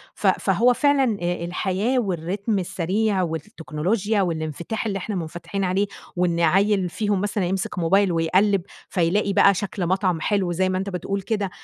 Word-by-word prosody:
ف - - -1
فهو 245 +1 +3
فعلًا، 270 -5 +2
آآ 175 -1 -2
الحياة 200 +8 0
والرتم 195 +2 -1
السريع 190 +3 0
والتكنولوجيا 180 +5 -1
والإنفتاح 170 +5 -3
اللي 200 -2 -1
إحنا 200 +2 -4
منفتحين 175 +4 -4
عليه، 190 +2 +1 0.3
وإن 175 -1 +1
عيِل 190 +2 +3
فيهم 205 0 -1
مثلًا 205 -2 -1
يمسِك 190 0 -2
موبايل 190 +3 +3
ويقلّب، 185 +4 +2 0.3
فيلاقي 195 +3 +1
بقى 200 0 +6
شكْل 195 -2 -3
مطعم 185 -3 +1
حلو 195 -4 0
زي 185 +2 +1
ما 185 - 0
أنت 195 +1 -3
بتقول 195 +2 -3
كده 205 -2 -2
190 Hz, 155 wpm, -23 LUFS, 175-205 Hz, 0.3 s, بقى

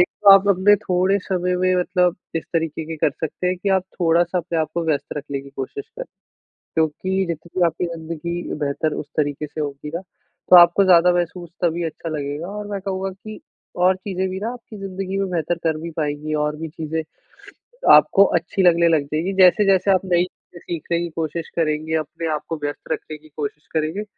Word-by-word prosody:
एक 180 - +6 0.2
तो 200 - +8
आप 195 +1 +6
अपने 200 +2 +5
थोड़े 185 +2 +1
समय 180 -1 -1
में 185 0 +2
मतलब 180 -1 +1 0.2
इस 160 - -3
तरीके 160 -1 -1
के 160 0 -6
कर 150 - +2
सकते 160 +5 -4
हैं 180 0 +1
कि 200 - 0
आप 185 - 0 0.2
थोड़ा-सा 175 +1 +2
अपने 170 -1 -2
आप 155 -1 0
को 170 -1 -1
व्यस्त 150 -1 -1
रखने 140 -1 -4
की 140 - -13
कोशिश 135 - -5
करें। - - -4 0.7
क्योंकि 185 +5 0
जितनी 170 +2 -2
आपकी 170 +1 -1
ज़िंदगी 170 +1 -5 0.2
बेहतर 150 +1 -1
उस 145 - -5
तरीके 145 0 -1
से 155 +1 -5
होगी 145 0 -5
ना 175 - -3 0.5
तो 180 - +9
आपको 175 +3 +8
ज़्यादा 180 -1 +6
महसूस 175 0 -2
तभी 170 0 +1
अच्छा 165 +1 -5
लगेगा 150 +2 -4
और 205 +1 -6
मैं 200 -1 -4
कहूँगा 190 0 -3
कि 215 +3 -10 0.4
और 185 +1 +3
चीज़ें 190 0 -3
भी 190 +1 -4
ना 220 +3 -2
आपकी 235 -3 -11
ज़िंदगी 195 0 -4
में 195 -1 -1
बेहतर 170 0 0
कर 160 -1 +1
भी 170 - -5
पाएँगी 150 0 -2
और 150 0 -1
भी 160 +1 -5
चीज़ें 160 0 -4 0.9
आपको 200 - +7
अच्छी 175 +3 -2
लगने 170 -1 +5
लग 160 -3 +3
जाएगी। 175 +5 -1
जैसे-जैसे 190 +1 +5
आप 185 - +3
नई 175 -1 +3
चीज़ें 175 -1 -12
सीखने 170 0 -3
की 170 - -3
कोशिश 165 0 -3
करेंगे 160 -1 0
अपने 160 +2 -4
आप 150 - -2
को 165 - -1
व्यस्त 145 +2 -5
रखने 155 0 -4
की 155 0 -20
कोशिश 150 +1 -5
करेंगे 160 +6 -1
170 Hz, 200 wpm, -21 LUFS, 155-185 Hz, 0.9 s, तो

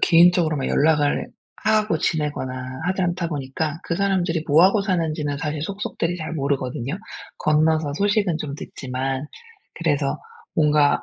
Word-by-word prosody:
개인적으로 170 -2 +5
막 135 - -2
연락을 150 -1 +2 0.4
하고 215 -6 +2
지내거나 130 -5 -2
하지 185 0 0
않다 175 -1 -1
보니까 150 +2 -3
그 170 - -1
사람들이 180 -5 0
뭐하고 185 +8 +5
사는지는 160 -6 -1
사실 150 -1 -3
속속들이 180 -2 -2
잘 160 -1 -5
모르거든요. 140 0 -2 0.4
건너서 155 -1 +2
소식은 200 -2 +1
좀 140 -2 -4
듣지만 135 0 -4 0.5
그래서 145 -4 0 0.4
뭔가 150 -2 +3
155 Hz, 330 characters per minute, -23 LUFS, 145-175 Hz, 0.5 s, 개인적으로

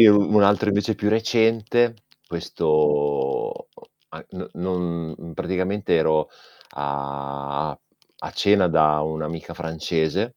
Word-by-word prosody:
io 105 -2 +9
un 105 +1 +4
altro 105 +2 +4
invece 105 +2 +1
più 105 - 0
recente, 115 +1 +2 0.3
questo 75 -4 0 0.4
a - - -11
n - - -7
non 85 -3 -3
mhmm, 85 - -10
praticamente 95 +4 -1
ero 80 -1 +2 0.4
a 70 +1 -4 0.4
a - - -7
cena 100 -2 +3
da 75 -2 +3
un'amica 80 +2 -4
francese 80 +6 -2
85 Hz, 110 wpm, -23 LUFS, 75-105 Hz, 0.4 s, io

